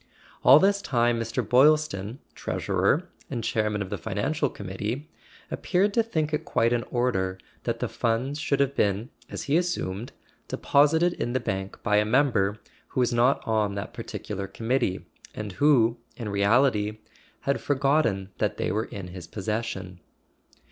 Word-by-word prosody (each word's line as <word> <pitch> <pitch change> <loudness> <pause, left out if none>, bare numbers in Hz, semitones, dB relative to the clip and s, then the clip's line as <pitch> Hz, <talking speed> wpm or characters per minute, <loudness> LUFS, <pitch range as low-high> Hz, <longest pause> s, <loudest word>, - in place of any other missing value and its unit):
All 135 - +9
this 200 +4 +3
time 120 -6 +1
Mr. 115 0 -2
Boylston, 130 -6 +3 0.2
treasurer, - - 0 0.2
and 115 - -3
chairman 105 -2 0
of 95 - -10
the - - -3
Financial 145 +9 -1
Committee, 105 +9 -5 0.4
appeared 200 +2 +1
to 230 - +4
think 160 -9 -1
it 150 - 0
quite 115 +1 +1
in 120 - +1
order 95 -7 0 0.3
that - - -2
the - - 0
funds 125 +6 -1
should 145 -2 0
have 140 0 +1
been 100 +3 0 0.2
(as - - -5
he 145 +3 +2
assumed) 120 - -2 0.4
deposited 160 +5 +3
in 120 - -3
the 130 - +1
bank 95 -4 -4
by 105 0 +3
a 105 - +4
member 110 -4 +2 0.3
who - - -3
was 125 -1 +2
not 120 +3 +2
on 105 -2 +1
that 100 0 -5
particular 100 -1 -5
committee, 115 -2 -1 0.3
and 105 -1 -5
who, 120 -1 +4 0.2
in 115 -4 -4
reality, 105 +1 +2 0.4
had 140 - 0
forgotten 135 -9 +1
that - - 0
they - - -1
were 110 +2 0
in 95 -3 -7
his 90 -1 -9
posses¬ 105 +5 -2
sion. 95 -5 -6
115 Hz, 160 wpm, -26 LUFS, 100-140 Hz, 0.4 s, All